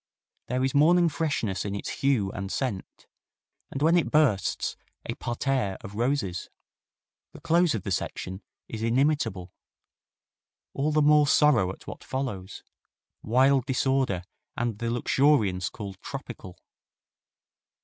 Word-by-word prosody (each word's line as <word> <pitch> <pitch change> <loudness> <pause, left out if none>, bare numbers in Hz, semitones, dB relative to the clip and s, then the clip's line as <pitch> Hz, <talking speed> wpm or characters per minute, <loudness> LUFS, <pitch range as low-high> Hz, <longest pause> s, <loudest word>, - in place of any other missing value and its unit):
There 125 +1 -1
is 130 - 0
morning 170 +4 +5
freshness 140 - -1
in 100 -1 -3
its 100 - -5
hue 125 -9 +2
and 95 -1 -5
scent, 115 -9 -4 0.6
and, 135 - -3
when 165 +2 +5
it 175 - +2
bursts, 145 -11 +1 0.3
a - - -3
parterre 120 -4 -2
of 100 - -9
roses. 115 -5 -1 0.8
The - - -11
close 170 -2 +2
of 105 - -4
the - - -4
section 95 +2 -3 0.3
is 110 - -6
inimitable. 115 - 0 1.2
All 145 +3 0
the 155 0 +3
more 150 0 +5
sorrow 140 -11 +4
at - - -13
what - - -9
follows: 105 -8 -5 0.6
wild 130 +3 +3
disorder 130 -8 +1 0.3
and 115 -3 -2
the 115 - -2
luxuriance 120 -6 +2
called 100 -4 -8
tropical. 90 -1 -8
125 Hz, 130 wpm, -27 LUFS, 100-145 Hz, 1.2 s, morning